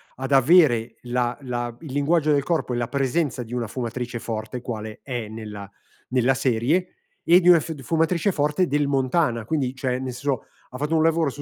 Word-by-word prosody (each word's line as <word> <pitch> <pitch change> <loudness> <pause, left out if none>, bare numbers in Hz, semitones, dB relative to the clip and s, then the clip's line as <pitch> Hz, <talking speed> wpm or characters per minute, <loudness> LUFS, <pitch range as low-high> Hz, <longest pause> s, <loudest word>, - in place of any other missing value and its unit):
ad 135 +2 -5
avere 135 -4 +4
la 120 0 -1
la 120 -2 -4
il 150 -5 -8
linguaggio 150 +2 +2
del 140 -2 +2
corpo 160 -7 -1
e - - -1
la 120 -1 -1
presenza 135 -2 -1
di 115 +2 -10
una 120 -3 -2
fumatrice 120 0 -4
forte, 110 +2 -5
quale 110 -3 -6
è 120 -5 -4
nella 105 -2 -8 0.4
nella 130 +1 +3
serie, 135 +9 0 0.3
e 175 +2 +6
di 180 0 +4
una 170 -2 +8
fiu 160 +2 -5
d 140 - -11
fumatrice 165 - +1
forte 150 +3 +1
del 145 0 +1
Montana, 130 -3 +1
quindi 135 -3 -1
cioè 125 -1 -1
nel 130 -1 -4
senso 130 -1 -2 0.2
ha 125 - -8
fatto 150 +4 -1
un 160 - +3
lavoro 165 -2 +2
su 145 +2 -8
130 Hz, 200 wpm, -23 LUFS, 120-155 Hz, 0.4 s, una